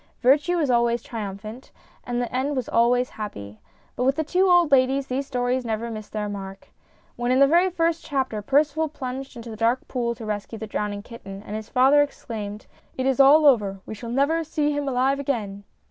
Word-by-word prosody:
Virtue 295 +7 +4
was 295 -6 +1
always 235 -1 +2
triumphant, 215 +2 -7 0.3
and 245 0 -3
the 245 0 -3
end 275 +3 0
was 255 -3 -2
always 245 +2 +2
happy. 105 - -7 0.4
But 250 - -1
with 270 +2 +2
the 315 - 0
two 365 +5 +2
old 350 -4 +5
ladies 270 +1 +3
these 270 +1 -3
stories 250 -1 -1
never 230 0 -3
missed 215 -1 -8
their 210 -1 -3
mark. 195 -1 -8 0.5
When 240 +1 -1
in 255 - +3
the 275 - +7
very 345 +6 +4
first 335 -2 0
chapter 265 -7 -2
Percival 295 +6 +2
plunged 265 -1 -6
into 235 -1 -8
the - - -7
dark 230 +3 0
pool 235 -2 -2
to 225 - -9
rescue 210 +1 -4
the 220 - -6
drowning 205 -1 -3
kitten, 200 -4 -10
and 210 - -6
his 220 0 -6
father 270 +3 +5
exclaimed: 215 -7 -5 0.2
" - - -34
It 260 - -1
is 270 0 +1
all 290 +3 +7
over; 205 -8 +3
we - - -7
shall 230 +2 -8
never 285 +7 +1
see 300 -1 -1
him 290 -1 -2
alive 265 +2 +1
again 210 -8 -3
250 Hz, 205 wpm, -24 LUFS, 220-280 Hz, 0.5 s, the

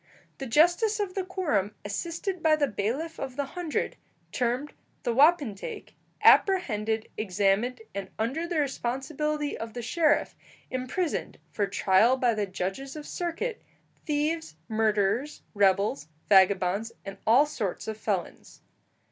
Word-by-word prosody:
The 270 - -4
justice 350 - +3
of 400 -3 -2
the 385 - -1
quorum, 300 - -1
assisted 340 - -3
by 315 -1 +5
the 300 -2 +2
bailiff 270 +9 -3
of 260 -2 -5
the 285 0 -1
hundred, 335 +2 -3 0.3
termed 250 +4 -1 0.3
the 240 - 0
wapentake, 280 - +2 0.3
apprehended, 225 - +4
examined, 210 +4 +1
and, 195 -1 -5
under 270 +10 -1
the 345 -2 -2
responsibility 290 +2 -2
of 225 0 -7
the 240 - -4
sheriff, 305 +4 +2 0.4
imprisoned, 255 +7 -2
for 205 -2 0
trial 200 +5 +3
by 245 -2 +2
the 210 -2 -1
judges 195 +10 -4
of 300 -1 -7
circuit, 355 +7 -3 0.5
thieves, 300 - -1
murderers, 220 +5 0
rebels, 195 -7 +2 0.2
vagabonds, 195 +2 +4
and 195 0 -8
all 250 +7 +6
sorts 220 -12 -4
of 220 - -3
felons. 205 -4 -4
250 Hz, 130 wpm, -27 LUFS, 205-310 Hz, 0.5 s, all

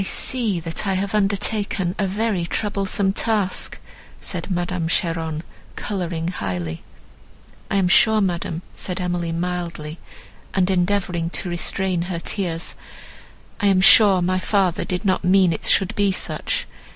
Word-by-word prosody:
"I - - 0
see 220 -1 -1
that 165 +5 -3
I 195 - +1
have 195 +2 -2
undertaken 200 -2 0
a 200 - +1
very 200 -3 -1
troublesome 195 -1 0
task," 210 -3 -1 0.4
said - - -4
Madame 175 -2 -1
Cheron, 165 -2 -1 0.3
colouring 175 -5 -3
highly. 90 - -4 0.9
"I - - -1
am 195 -2 +3
sure, 220 +4 +5
madam," 175 -3 -2
said 180 -1 -5
Emily 175 -2 -2
mildly, 170 -2 -4 0.6
and 190 -1 +2
endeavouring 180 -2 0
to 180 - -3
restrain 180 +1 0
her 175 - -2
tears, 170 -2 -3 0.9
"I 205 - +2
am 195 -2 +4
sure 195 -1 +7
my 185 +1 +1
father 190 -3 +1
did 180 +3 -3
not 185 -1 +1
mean 185 -1 +4
it - - -4
should 190 -2 +3
be 200 -1 +2
such. 185 - 0
185 Hz, 140 wpm, -22 LUFS, 170-195 Hz, 0.9 s, sure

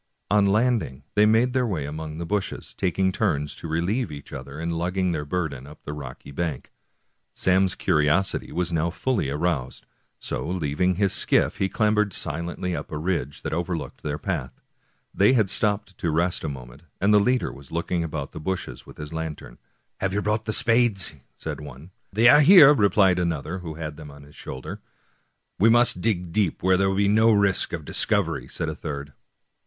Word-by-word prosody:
On 105 -1 +4
landing 105 - +1
they 105 +1 +5
made 115 +3 +3
their 130 -2 +1
way 85 -10 -2
among 75 +1 -6
the 85 - -4
bushes, 100 +2 -3
taking 95 +1 0
turns 75 -8 -1
to - - -7
relieve 85 +7 -1
each 70 -1 -10
other 70 +2 -8
in 85 +1 -2
lugging 90 +2 -1
their 75 -3 -3
burden 75 -5 -3
up 75 +1 -14
the 75 - -6
rocky 70 -2 -9
bank. 75 -2 -4 0.6
Sam's 95 0 +2
curiosity 75 +6 +1
was 90 -1 -2
now 80 +1 +1
fully 90 - -1
aroused, 75 -3 -2 0.3
so - - -4
leaving 90 +1 0
his 100 +1 +1
skiff - - +1
he 95 - 0
clambered 105 -2 +1
silently 85 +3 -3
up - - -6
a 75 - -3
ridge 80 -4 -3
that - - -3
over 85 +1 -1
looked 75 -5 -8
their 75 -1 -3
path. 75 -8 -4 0.5
They 100 +6 +4
had 110 -6 +2
stopped 105 -3 0
to 85 - -1
rest 85 +3 +1
for - - -3
a - - -2
moment^ 65 -3 -9 0.2
and 100 +2 +3
the 105 - +7
leader 125 +4 +1
was 70 0 -14
looking 85 +1 -1
about 80 -1 -4
among 70 -1 -4
the - - -8
bushes 80 -7 -5
with - - -13
his 75 +1 -8
lantern. 80 -6 -6 0.2
" - - -48
Have 95 -1 0
you 105 0 -1
brought 105 +1 0
the 110 - -1
spades? 115 -7 +3
" - - -45
said - - -6
one. 75 +4 -11
" - - -46
They 110 +4 +4
are 145 +4 +8
here," 150 -2 +9
replied 100 -6 +3
another, 85 +1 -2
who 80 -3 -7
had 75 -2 -6
them 75 -2 -10
on 70 0 -13
his 70 +1 -17
shoulder, 65 -1 -8 0.4
" - - -48
We 110 +5 +5
must 120 -5 +4
dig 90 -5 -1
deep, 100 -4 0
where 95 0 +4
there 95 +1 +2
will 95 - -1
be 100 0 +3
no 110 +2 +4
risk 100 -2 +2
of - - -5
dis - - +1
covery," - - 0
said - - -3
a - - -2
third. 70 -1 -6
90 Hz, 205 wpm, -24 LUFS, 75-100 Hz, 0.6 s, here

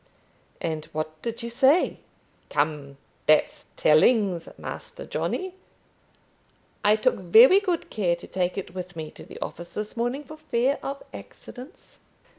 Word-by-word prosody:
"And 160 -2 -3
what 155 0 -4
did 230 -1 -4
she 235 - -4
say?" 265 +8 +3 0.5
"Come; 145 -2 -1 0.3
that's 155 0 +3
tellings, 180 +2 +4
Master - - -7
Johnny. 375 -1 -2 1.3
I 210 +1 +6
took 215 - +2
very 225 - +8
good 365 -5 -2
care 180 -5 +1
to 170 - -12
take 185 0 -1
it 185 -2 -5
with 180 -1 -6
me 155 -1 -6
to - - -12
the - - -11
office 170 +1 -8
this 210 0 -5
morning, 245 +5 -1
for 310 +3 -11
fear 275 -3 0
of 275 +1 -5
accidents." 260 +7 -11
210 Hz, 140 wpm, -26 LUFS, 165-260 Hz, 1.3 s, very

